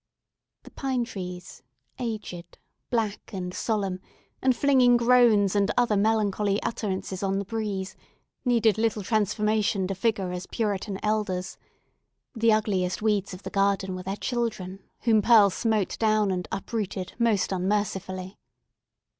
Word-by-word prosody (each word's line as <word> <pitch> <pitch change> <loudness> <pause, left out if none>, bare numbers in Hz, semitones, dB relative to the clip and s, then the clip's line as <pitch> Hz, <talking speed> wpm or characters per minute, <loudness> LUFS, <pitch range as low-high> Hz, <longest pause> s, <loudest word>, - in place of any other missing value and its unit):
The - - -14
pine 260 -3 -1
trees, 180 -4 -8 0.4
aged, 215 -7 -5 0.3
black, 220 -4 -2
and 180 -2 -4
solemn, 195 -5 -1 0.4
and 260 -1 +3
flinging 250 -2 +5
groans 235 -5 +4
and 200 -1 +2
other 240 -3 +3
melancholy 205 -1 +1
utterances 190 -4 -3
on 195 -1 0
the 200 - -2
breeze, 205 -3 -3 0.5
needed 230 -4 +3
little 220 -2 0
transformation 210 -1 +1
to 195 - -2
figure 195 -2 -1
as 180 +1 -5
Puritan 205 -2 -2
elders; 205 -4 -1 0.8
the 230 -2 +3
ugliest 205 -3 0
weeds 205 -3 0
of 185 - -13
the - - -6
garden 195 -1 +1
were 185 - -5
their 195 +2 -4
children, 215 -7 -3 0.2
whom 220 -3 +4
Pearl 210 -3 +6
smote 215 -1 -1
down 215 -2 +2
and 180 -1 -3
uprooted 195 -3 -4
most 225 -5 +2
unmercifully. 190 0 -2
205 Hz, 130 wpm, -26 LUFS, 190-225 Hz, 0.8 s, Pearl